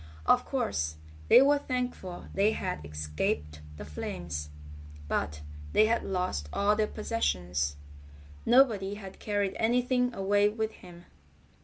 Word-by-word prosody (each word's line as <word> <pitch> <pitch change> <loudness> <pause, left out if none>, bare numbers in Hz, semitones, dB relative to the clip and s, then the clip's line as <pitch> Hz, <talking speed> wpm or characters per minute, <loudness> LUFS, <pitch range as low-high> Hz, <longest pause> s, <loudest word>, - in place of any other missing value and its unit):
Of - - +4
course, 80 +1 -1 0.3
they 260 - +8
were 285 +1 +4
thankful 250 -9 -4
they 205 +3 +3
had 75 - -3
escaped 75 0 -3 0.2
the 70 - -7
flames, 75 0 -5 0.6
but 75 0 -2 0.3
they 215 - +6
had 230 +2 +2
lost 180 - -2
all 205 +1 +2
their 215 0 +1
possessions. 90 - -1 0.7
Nobody 225 -6 +4
had 195 -2 -10
carried 205 -2 -1
anything 250 +2 +2
away 205 +1 +3
with 220 +1 -2
him. 175 -3 -14
195 Hz, 125 wpm, -29 LUFS, -, 0.7 s, they